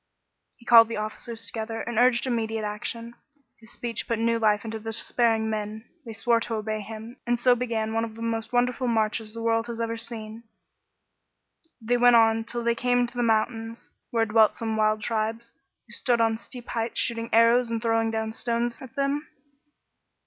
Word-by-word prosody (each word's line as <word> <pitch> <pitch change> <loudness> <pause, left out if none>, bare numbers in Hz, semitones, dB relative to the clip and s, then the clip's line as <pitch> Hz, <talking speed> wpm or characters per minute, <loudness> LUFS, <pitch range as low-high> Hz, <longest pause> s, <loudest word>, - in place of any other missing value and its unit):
He 235 - -21
called 230 -1 +8
the 230 - -4
officers 220 +1 -4
together; 225 +2 -4
he 235 - -3
urged 245 +1 +4
im 250 -2 0
mediate 225 -1 -2
action. 230 +3 -4 0.5
His 225 0 -13
speech 235 -2 -5
put 230 - 0
new 230 +1 +1
life 210 -1 +2
into 225 0 -4
the 215 - -18
despairing 225 0 +1
men; 215 +1 -4 0.2
they 225 - -6
swore 230 +1 +2
to 230 0 -3
obey 215 0 -3
him, 220 +4 -9
and 240 0 +1
so 250 +1 +5
began 230 -3 -2
one 225 0 +1
of 225 -1 -6
the 230 - -7
most 225 -1 -2
wonderful 250 +1 +1
marches 220 -1 0
the 230 - -5
world 225 0 +1
has 235 -1 -6
ever 230 0 -2
seen. 225 0 -6 1.3
They 240 +1 0
went 245 0 +6
on 225 -1 +4
till 240 0 -4
they 235 0 +2
cariie 245 +1 +1
to 245 - -20
the - - +1
mountains, 225 0 -1 0.2
where 230 -1 +1
dwelt 220 0 +4
some 225 -1 -3
wild 215 0 +1
tribes, 225 +1 -2 0.3
who - - -19
stood 240 -3 +1
on 225 -1 +2
steep 245 0 -11
heights 230 0 -2
shooting 230 0 -1
arrows 230 +2 +5
and 230 -1 -1
throwing 225 0 +1
down 220 0 -2
stones 235 0 -2
at 260 -3 -11
them. 280 +2 -1
230 Hz, 190 wpm, -26 LUFS, 220-235 Hz, 1.3 s, called